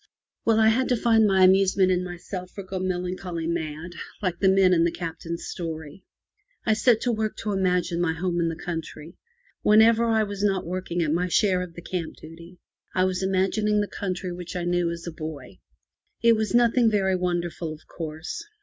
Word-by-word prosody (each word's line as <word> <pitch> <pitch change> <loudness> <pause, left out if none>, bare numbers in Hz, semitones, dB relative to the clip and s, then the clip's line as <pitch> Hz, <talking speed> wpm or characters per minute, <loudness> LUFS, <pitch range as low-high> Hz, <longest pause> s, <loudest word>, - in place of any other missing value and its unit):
Well, 225 -1 +4
I 220 0 +6
had 255 +4 +1
to 250 - +3
find 225 -1 +4
my 190 -1 +4
amusement 190 0 +4
in 180 0 +1
myself, 180 +1 -7
or 200 - -4
go 190 0 -5
melancholy 180 -2 -3
mad, 165 0 -3 0.3
like 180 -4 -2
the 190 - +4
men 190 -1 +5
in 165 -1 +4
the 170 - +2
Captain's 170 0 -5
story. 160 0 -6 0.6
I 220 - +4
set 225 +1 +3
to 245 - +1
work 215 -1 -2
to 210 - -1
imagine 180 -3 0
my 170 -2 +1
home 175 +1 -2
in 165 -1 +1
the 165 - -4
country. 165 -1 -6 0.5
Whenever 225 +2 +5
I 220 -1 +2
was 205 -1 -4
not 195 -2 +1
working 175 0 -2
at 155 -1 0
my 180 +2 0
share 185 0 +2
of 175 -2 -7
the 170 - -9
camp 175 -3 -4
duty, 170 +3 -13 0.4
I 185 - +3
was 185 0 0
imagining 195 +3 +1
the 205 - 0
country 185 -3 -4
which 175 0 -8
I 175 - -2
knew 175 0 +1
as 170 0 -6
a 170 - -4
boy. 150 - -8 0.6
It 230 -1 +6
was 220 +1 -1
nothing 240 0 +4
very 190 -3 +1
wonderful, 175 -2 -2
of 155 0 -11
course. 160 0 -6
180 Hz, 195 wpm, -25 LUFS, 170-205 Hz, 0.6 s, I